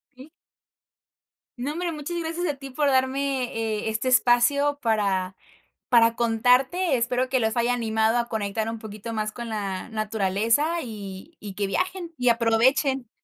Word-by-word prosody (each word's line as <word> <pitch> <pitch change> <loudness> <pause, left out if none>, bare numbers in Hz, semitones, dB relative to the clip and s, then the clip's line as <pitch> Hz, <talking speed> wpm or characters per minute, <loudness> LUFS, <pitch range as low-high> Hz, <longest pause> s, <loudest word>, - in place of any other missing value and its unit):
Sí. 265 +5 -14 1.3
No, 265 +5 -3
hombre, 345 +1 -2
muchas 310 +2 -5
gracias 335 +2 -3
a 295 - -1
ti 275 0 -9
por 290 +2 0
darme, 265 0 +1
eh, 220 -1 -2
este 220 +3 -2
espacio 255 +4 +3
para 195 -4 0 0.5
para 230 -1 +5
contarte, 250 +8 +2
espero 245 +2 0
que 260 0 +2
los 220 0 0
haya 235 +1 +2
animado 220 -1 +1
a 235 0 -2
conectar 220 0 -2
un 230 - -4
poquito 215 +1 -8
más 215 -1 -2
con 235 0 -7
la 200 -3 -4
naturaleza 220 - 0
y 210 - -9
y 200 -2 -8
que 205 - -1
viajen 360 - -2
y 250 -1 +2
aprovechen, 240 +3 +2
240 Hz, 155 wpm, -25 LUFS, 220-275 Hz, 1.3 s, para